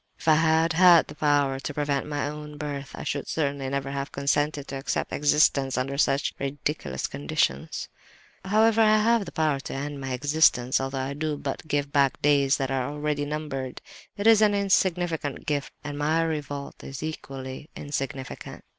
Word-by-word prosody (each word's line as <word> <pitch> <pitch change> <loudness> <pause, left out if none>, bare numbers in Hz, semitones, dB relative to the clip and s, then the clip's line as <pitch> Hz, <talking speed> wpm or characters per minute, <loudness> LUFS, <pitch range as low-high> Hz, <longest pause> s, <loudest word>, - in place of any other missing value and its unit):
"If - - -12
I 160 - +7
had 160 +1 +3
had 175 -1 +7
the - - -7
power 145 -3 +1
to 145 - -5
prevent 145 -1 -1
my 145 -1 -2
own 150 0 -7
birth 145 -2 -5
I - - -7
should 140 - -3
certainly 140 -3 -1
never 135 0 -2
have 140 0 -4
consented 145 +1 0
to 135 - -4
accept 135 - -2
existence 145 -2 +3
under 135 +2 -1
such 140 -1 +2
ridiculous 140 - -3
conditions. 70 0 -1 0.6
However, 220 +3 +3
I 215 -1 +6
have 225 0 +3
the 170 - -8
power 155 -3 +1
to 135 - -6
end 140 +1 -4
my 135 -1 -3
existence, 135 -2 +3
although 135 0 -3
I 135 +1 -2
do 150 0 -2
but 140 +2 -5
give 145 -1 -1
back 140 -2 +2
days 140 -2 +3
that 135 -1 -2
are 130 0 -1
already 150 0 -2
numbered. 145 -4 -4 0.4
It 200 - -3
is 225 -1 +7
an 210 -1 +4
insignificant 175 -6 0
gift, 145 -2 -1
and 145 -1 -5
my 160 +3 +2
revolt 145 -3 -4
is 135 +1 -7
equally 135 -2 -6
insignificant. 135 -2 -5
145 Hz, 175 wpm, -26 LUFS, 135-155 Hz, 0.6 s, I